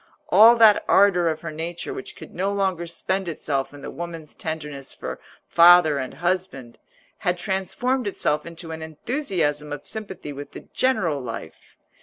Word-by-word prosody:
All 220 +6 +8
that 220 -3 +6
ardour 190 -3 +5
of 155 -1 -1
her 170 - -5
nature 170 - -5
which 400 +1 -8
could - - -12
no 195 +3 -1
longer 190 -4 -1
spend 190 +2 -2
itself 140 -4 -2
in 145 -1 -12
the - - -6
woman's 165 -3 -7
tenderness 150 -4 -6
for - - -6 0.3
father 170 -4 +6
and 130 0 -5
husband, 170 -7 -3 0.4
had 180 0 0
transformed 210 +7 -1
itself 150 -6 0
into 170 0 -8
an 160 0 -6
enthusiasm 160 - -2
of 145 -1 -6
sympathy 190 -9 -5
with 145 +1 -9
the - - -8
general 175 - +1
life. 115 -9 -8
170 Hz, 160 wpm, -23 LUFS, 150-195 Hz, 0.4 s, All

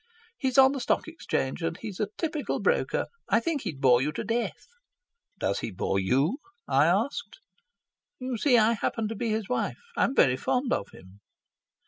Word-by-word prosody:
"He's 260 - -1
on 265 0 +8
the 275 - -3
Stock 245 - 0
Exchange, 180 - -3
and 165 0 -2
he's 205 -3 -7
a 210 - +1
typical 310 -3 -2
broker. 485 +1 +1 0.2
I - - +4
think 325 -5 -2
he'd 165 - -5
bore 125 -3 +5
you 150 +3 0
to - - -3
death." 230 +3 -2 0.7
"Does - - -1
he - - -4
bore 95 0 -1
you?" 135 - +1 0.3
I 140 +2 +4
asked. 230 - 0 0.8
"You 255 -1 -4
see, 245 +2 +4
I 225 +1 +4
happen 225 0 -1
to 225 - -4
be 230 +2 -2
his 215 -2 -1
wife. 250 - -1 0.2
I'm 270 - +1
very 130 -1 +4
fond 250 - 0
of 100 - -1
him." 95 +2 -16
220 Hz, 180 wpm, -27 LUFS, -, 0.8 s, on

